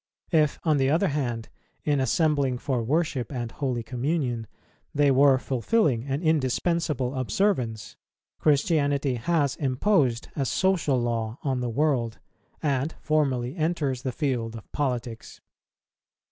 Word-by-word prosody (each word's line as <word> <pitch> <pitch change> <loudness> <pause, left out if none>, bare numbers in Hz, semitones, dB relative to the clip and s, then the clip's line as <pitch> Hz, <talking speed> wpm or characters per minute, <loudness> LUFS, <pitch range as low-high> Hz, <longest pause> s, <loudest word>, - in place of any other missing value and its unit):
If, 155 -4 +3
on 155 -3 +3
the 135 -1 +2
other 170 +6 +2
hand, 120 -6 -2 0.3
in 145 -2 +1
assembling 140 -1 +1
for 125 -1 -1
worship 140 -1 -1
and 120 -4 -4
holy 125 -4 -2
communion, 125 -2 -2 0.5
they 145 -1 +4
were 135 0 +5
fulfilling 130 - +1
an 140 +4 -2
indispensable 150 -2 +1
observance, 130 - -1 0.4
Christianity 145 -3 +2
has 140 +3 0
imposed 135 - +1
a 135 -3 -1
social 175 -9 +1
law 115 -1 -2
on 135 -3 0
the 125 -1 -2
world, 125 -3 0 0.5
and 140 +1 0
formally 135 -5 0
enters 155 -6 -1
the 130 - -2
field 120 -5 -2
of 110 - -11
politics. 125 -5 -3
135 Hz, 125 wpm, -26 LUFS, 125-155 Hz, 0.5 s, were